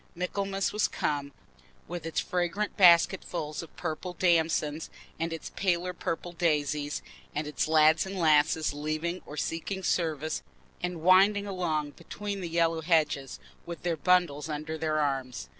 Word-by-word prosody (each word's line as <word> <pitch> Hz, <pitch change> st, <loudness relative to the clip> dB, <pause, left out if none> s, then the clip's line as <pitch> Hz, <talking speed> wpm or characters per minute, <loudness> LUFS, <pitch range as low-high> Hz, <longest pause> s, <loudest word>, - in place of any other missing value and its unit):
Michaelmas 195 Hz, +2 st, -2 dB
was 210 Hz, 0 st, +2 dB
come, 140 Hz, -1 st, -2 dB, 0.6 s
with 170 Hz, -2 st, -5 dB
its 165 Hz, -, -1 dB
fragrant 180 Hz, +4 st, -1 dB
basketfuls 170 Hz, -4 st, +4 dB
of 165 Hz, -, -12 dB
purple 180 Hz, +3 st, -4 dB
damsons, 165 Hz, -3 st, +1 dB, 0.3 s
and 165 Hz, +1 st, -1 dB
its 165 Hz, -, -6 dB
paler 180 Hz, -1 st, 0 dB
purple 175 Hz, 0 st, -4 dB
daisies, 150 Hz, -4 st, 0 dB, 0.3 s
and 150 Hz, +1 st, -1 dB
its 150 Hz, +1 st, -1 dB
lads 155 Hz, 0 st, +5 dB
and 190 Hz, 0 st, -5 dB
lasses 155 Hz, -2 st, +3 dB
leaving 155 Hz, +4 st, -3 dB
or 150 Hz, -, -8 dB
seeking 190 Hz, +5 st, -3 dB
service 160 Hz, -4 st, -1 dB, 0.4 s
and 180 Hz, -3 st, -3 dB
winding 195 Hz, +3 st, +5 dB
along 165 Hz, -7 st, -2 dB
between 200 Hz, +5 st, -6 dB
the 175 Hz, -, -4 dB
yellow 165 Hz, -1 st, +1 dB
hedges, 155 Hz, -5 st, +1 dB, 0.3 s
with 170 Hz, -1 st, -7 dB
their 175 Hz, -1 st, 0 dB
bundles 160 Hz, -2 st, +2 dB
under 155 Hz, +1 st, -4 dB
their 155 Hz, -1 st, 0 dB
arms. 130 Hz, -, -2 dB
165 Hz, 140 wpm, -29 LUFS, 150-180 Hz, 0.6 s, lads